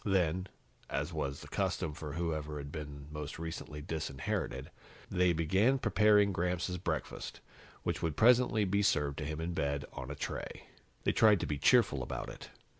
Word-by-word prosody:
Then, 95 -2 +1 0.4
as - - -2
was 70 0 -2
the - - -10
custom 75 - -1
for 75 -1 -6
whoever 75 -2 -2
had 70 0 -6
been 75 -2 -7
most 75 -1 -5
recently 80 -2 -6
disinherited, 75 -4 -3 0.4
they 90 -1 +4
began 95 - +3
preparing 105 -3 +4
Gramps' 90 0 -1
breakfast, 85 -3 -4 0.4
which - - -1
would 80 -3 -1
presently 120 -2 +5
be 100 +2 +2
served 75 -7 +2
to 75 - -3
him 75 +1 -3
in 85 +2 -2
bed, 70 -2 -1
on 65 - -6
a 75 - -4
tray. - - -5 0.4
They - - +3
tried 105 -3 +5
to - - 0
be 70 0 -2
cheerful 115 - +4
about - - -4
it. - - -10
80 Hz, 170 wpm, -33 LUFS, 75-95 Hz, 0.4 s, presently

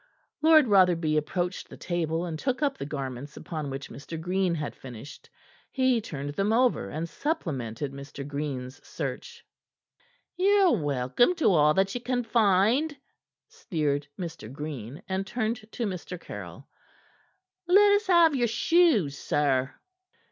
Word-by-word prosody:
Lord 310 -3 +6
Rotherby 175 -6 +4
approached 175 +4 -2
the - - -11
table, 170 -1 -2
and 160 -3 -5
took 260 - -1
up 280 -2 +1
the 140 - -6
garments 140 -1 -6
upon 155 -4 -5
which 135 0 -6
Mr. 155 +3 -7
Green 180 +1 0
had 150 -2 -4
finished. 130 +2 -11 0.4
He 260 -3 +2
turned 145 -8 -5
them 200 +5 0
over 235 - +2
and 160 +7 -4
supplemented 145 - -3
Mr. 140 0 -8
Green's 140 -3 -5
search. 470 0 -6 0.9
"Ye're 390 0 +4
welcome 145 - +2
to 315 - +3
all 150 -2 +4
that 195 0 +2
ye 245 - -4
can 245 0 -1
find," 225 +7 +2 0.5
sneered 155 - -2
Mr. 165 - -7
Green, 140 -3 -7
and 190 +1 -2
turned 220 -1 -3
to 235 - -3
Mr. 180 -2 -5
Caryll. - - -9 1.0
"Let 405 +3 +6
us 410 0 +2
have 340 -4 +5
your 240 -2 +2
shoes, 230 - +3
sir." 140 -3 0
180 Hz, 140 wpm, -27 LUFS, -, 1.0 s, Lord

